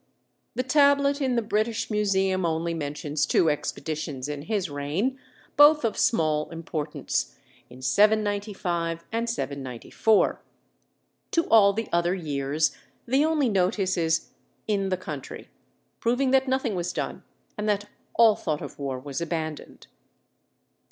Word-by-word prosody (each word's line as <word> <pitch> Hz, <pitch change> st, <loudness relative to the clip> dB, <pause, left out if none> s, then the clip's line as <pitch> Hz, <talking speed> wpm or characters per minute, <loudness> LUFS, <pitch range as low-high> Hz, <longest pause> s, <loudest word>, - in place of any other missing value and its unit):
The 255 Hz, -, 0 dB
tablet 280 Hz, +1 st, +3 dB
in 260 Hz, -2 st, +1 dB
the 235 Hz, -, +1 dB
British 215 Hz, +2 st, -1 dB
Museum 195 Hz, -3 st, +1 dB
only 165 Hz, 0 st, -1 dB
mentions 150 Hz, -1 st, -2 dB
two 160 Hz, +1 st, +3 dB
expeditions 150 Hz, -2 st, -4 dB
in 145 Hz, -1 st, -4 dB
his 200 Hz, +2 st, -1 dB
reign, 155 Hz, -, -2 dB, 0.4 s
both 295 Hz, -2 st, +7 dB
of 225 Hz, -, 0 dB
small 155 Hz, -8 st, +1 dB
importance, 150 Hz, -, -3 dB, 0.3 s
in 125 Hz, +1 st, -13 dB
795 200 Hz, -, +1 dB
and 230 Hz, +1 st, -1 dB
794; 140 Hz, -, 0 dB, 0.9 s
to 335 Hz, -, +3 dB
all 205 Hz, -3 st, +6 dB
the 225 Hz, +2 st, -3 dB
other 170 Hz, +1 st, +2 dB
years 150 Hz, -2 st, -1 dB, 0.3 s
the 265 Hz, +4 st, +3 dB
only 310 Hz, -4 st, +2 dB
notice 190 Hz, -1 st, +1 dB
is 165 Hz, -2 st, 0 dB, 0.4 s
"in 200 Hz, -2 st, 0 dB
the 185 Hz, -, 0 dB
country," 185 Hz, -, -8 dB, 0.5 s
proving 250 Hz, +3 st, +1 dB
that 265 Hz, 0 st, +3 dB
nothing 260 Hz, -4 st, 0 dB
was 175 Hz, -1 st, -2 dB
done -, -, -4 dB, 0.3 s
and 210 Hz, 0 st, -2 dB
that 205 Hz, 0 st, 0 dB, 0.3 s
all 225 Hz, -2 st, +6 dB
thought 155 Hz, -3 st, -3 dB
of -, -, -9 dB
war 135 Hz, -2 st, -3 dB
was 140 Hz, +3 st, -5 dB
abandoned. 160 Hz, -2 st, -5 dB
190 Hz, 130 wpm, -26 LUFS, 155-225 Hz, 0.9 s, both